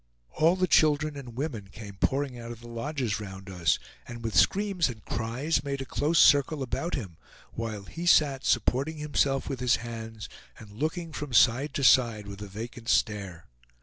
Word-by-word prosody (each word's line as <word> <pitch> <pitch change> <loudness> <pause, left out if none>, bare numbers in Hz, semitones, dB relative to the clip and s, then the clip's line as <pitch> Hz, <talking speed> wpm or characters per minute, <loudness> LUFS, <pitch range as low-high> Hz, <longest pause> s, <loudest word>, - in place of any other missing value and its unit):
All 165 +3 +3
the 185 0 +2
children 155 -3 +3
and 125 -4 -9
women 130 -9 -4
came 100 0 -10
pouring 135 +2 -1
out 115 0 -7
of 115 - -9
the 120 - -11
lodges 120 -2 -3
round 95 -2 -8
us, 85 -4 +1 0.3
and 120 -1 -8
with 115 -3 -3
screams 185 - +3
and 110 -4 -9
cries 130 +6 -1
made 140 -1 -3
a 135 - -4
close 155 +5 0
circle 145 0 +5
about 165 +7 -2
him, 95 - -6 0.4
while 110 -3 -4
he 170 - -6
sat 140 -5 +4
supporting 135 +6 +1
himself 145 -2 0
with 135 -3 -4
his 125 -2 +3
hands, 115 -2 -7 0.3
and 105 -4 -13
looking 160 - -3
from 150 -4 -5
side 125 +5 +4
to 140 - -1
side 115 -4 +4
with 100 0 -9
a 105 - -6
vacant 115 +4 -7
stare. 100 -5 0
120 Hz, 180 wpm, -28 LUFS, 110-145 Hz, 0.4 s, circle